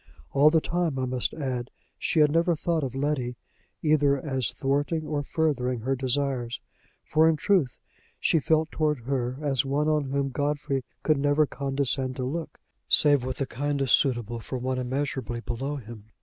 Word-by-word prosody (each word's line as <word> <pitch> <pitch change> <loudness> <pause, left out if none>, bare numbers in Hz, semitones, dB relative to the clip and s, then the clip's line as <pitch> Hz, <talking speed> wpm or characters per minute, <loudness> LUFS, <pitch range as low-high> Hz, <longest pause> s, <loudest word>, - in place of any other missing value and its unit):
All 145 +2 +6
the 160 +1 +4
time, 170 -5 -1
I 130 - 0
must 125 -1 -1
add, 130 -4 -3 0.3
she 160 - +2
had 150 -1 +5
never 165 +2 +3
thought 160 0 -1
of 130 -1 -4
Letty 135 -3 -1 0.5
either 145 -2 +3
as 130 -5 -2
thwarting 145 +4 -1
or 150 -1 -1
furthering 135 -5 0
her 135 +4 0
desires, 130 -2 -1 0.4
for 160 +1 +4
in 160 - +3
truth 155 - +1 0.4
she 165 - +3
felt 160 +1 +1
toward 150 -4 0
her 125 0 -2
as 135 -4 +1
one 140 +2 0
on 150 -2 +2
whom 140 +1 -1
Godfrey 145 -1 -1 0.2
could 155 -2 +3
never 145 +2 +3
condescend 135 -2 -1
to 130 - -3
look, 160 +6 -4 0.3
save 145 -4 +5
with 130 0 -3
the 135 - -1
kindness 140 +1 -1
suitable 120 -4 +2
for 130 +3 -5
one 130 +1 -2
immeasurably 130 -2 -2
below 135 +6 -3
him. 115 -5 -9
140 Hz, 170 wpm, -27 LUFS, 130-150 Hz, 0.5 s, All